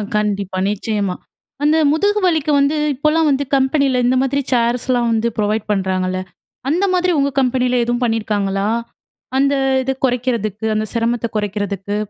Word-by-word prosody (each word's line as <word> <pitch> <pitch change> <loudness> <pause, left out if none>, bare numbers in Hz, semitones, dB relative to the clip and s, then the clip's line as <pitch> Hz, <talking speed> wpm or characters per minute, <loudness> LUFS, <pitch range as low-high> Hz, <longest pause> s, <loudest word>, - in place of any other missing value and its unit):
கண்டிப்பா. 200 -3 -1
நிச்சியமா, 205 -2 -2 0.5
அந்த 300 +2 +4
முதுகு 405 +7 +2
வலிக்கு 315 -4 +1
வந்து 280 +2 +2 0.2
இப்போலாம் 305 +3 +2
வந்து 280 0 +1
கம்பெனியில, 265 -1 +2
இந்த 250 +1 +3
மாதிரி 280 +1 0
சேர்ஸ்லாம் 240 0 +1
வந்து 225 +1 +1
ப்ரொவைட் 215 0 0
பண்ணுறாங்கல்ல, 185 -2 -1 0.5
அந்த 350 +7 +2
மாதிரி 365 0 +2
உங்க 280 0 +2
கம்பெனியில 250 -1 +1
எதுவும் 240 +1 -1
பண்ணியிருக்காங்களா? 205 -4 0 0.7
அந்த 280 +1 +3 0.3
இத 265 +1 -1
குறைக்கிறதுக்கு, 235 -4 -1
அந்த 215 0 0
சிரமத்தை 235 0 0
குறைக்கிறதுக்கு. 205 -1 -3
240 Hz, 135 wpm, -18 LUFS, 210-275 Hz, 0.7 s, அந்த